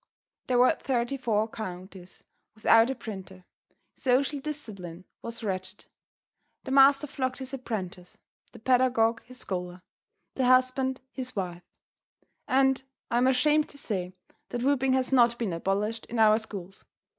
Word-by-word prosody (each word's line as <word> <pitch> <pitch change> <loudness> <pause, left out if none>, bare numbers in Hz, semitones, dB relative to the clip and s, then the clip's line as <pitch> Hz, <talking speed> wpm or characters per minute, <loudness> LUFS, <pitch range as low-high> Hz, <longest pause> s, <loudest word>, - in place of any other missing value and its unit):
There 250 - +2
were 250 +1 +6
thirty 245 0 -1
four 220 -5 0
counties 185 -3 -9 0.3
without 225 +2 +5
a 265 - -2
printer. 190 -5 -9 0.5
Social 275 +3 +1
discipline 200 - -6 0.2
was 230 0 -6
wretched. 190 -1 -4 0.8
The 265 - -6
master 275 +1 +6
flogged 260 -2 -3
his 265 0 -6
apprentice, 190 -8 -6 0.3
the - - -13
pedagogue 245 -1 +2
his 255 +1 -12
scholar, 180 -4 -5 0.5
the 260 - 0
husband 255 +1 +3
his 255 -1 -4
wife; 180 -3 -4 0.9
and 265 0 +3 0.3
I 235 - +2
am 255 - +3
ashamed 300 +4 +3
to 285 - -12
say 185 -9 -3 0.4
that 240 - -3
whipping 270 -1 +2
has 260 0 0
not 240 -2 +4
been 220 -7 -2
abolished 205 +6 -2
in 240 - -5
our 215 0 +5
schools. 195 -4 -8
235 Hz, 140 wpm, -28 LUFS, 195-260 Hz, 0.9 s, were